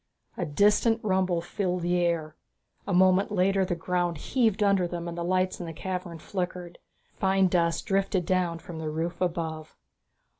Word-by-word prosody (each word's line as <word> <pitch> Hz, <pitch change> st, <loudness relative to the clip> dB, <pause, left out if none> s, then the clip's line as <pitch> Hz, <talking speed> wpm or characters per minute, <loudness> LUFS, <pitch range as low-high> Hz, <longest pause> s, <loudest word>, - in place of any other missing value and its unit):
A 175 Hz, -, -3 dB
distant 210 Hz, +8 st, +3 dB
rumble 185 Hz, -4 st, +1 dB
filled 180 Hz, -1 st, -2 dB
the 175 Hz, +1 st, +1 dB
air. 165 Hz, -3 st, -1 dB, 0.5 s
A -, -, -2 dB
moment 185 Hz, +2 st, +4 dB
later 195 Hz, 0 st, +2 dB
the 180 Hz, -1 st, -1 dB
ground 175 Hz, 0 st, -1 dB
heaved 220 Hz, -, +1 dB
under 200 Hz, -3 st, +3 dB
them 170 Hz, 0 st, -5 dB
and 170 Hz, -, -5 dB
the 170 Hz, -, -3 dB
lights 185 Hz, +1 st, 0 dB
in 175 Hz, -, -5 dB
the 165 Hz, -, -6 dB
cavern 180 Hz, -1 st, -5 dB
flickered. 180 Hz, 0 st, -5 dB, 0.3 s
Fine 190 Hz, -1 st, +2 dB
dust 170 Hz, -2 st, +1 dB
drifted 195 Hz, -3 st, 0 dB
down 180 Hz, -2 st, 0 dB
from 165 Hz, 0 st, -9 dB
the 155 Hz, -1 st, -3 dB
roof 165 Hz, +4 st, -3 dB
above. 165 Hz, -3 st, -3 dB
180 Hz, 165 wpm, -27 LUFS, 170-190 Hz, 0.5 s, moment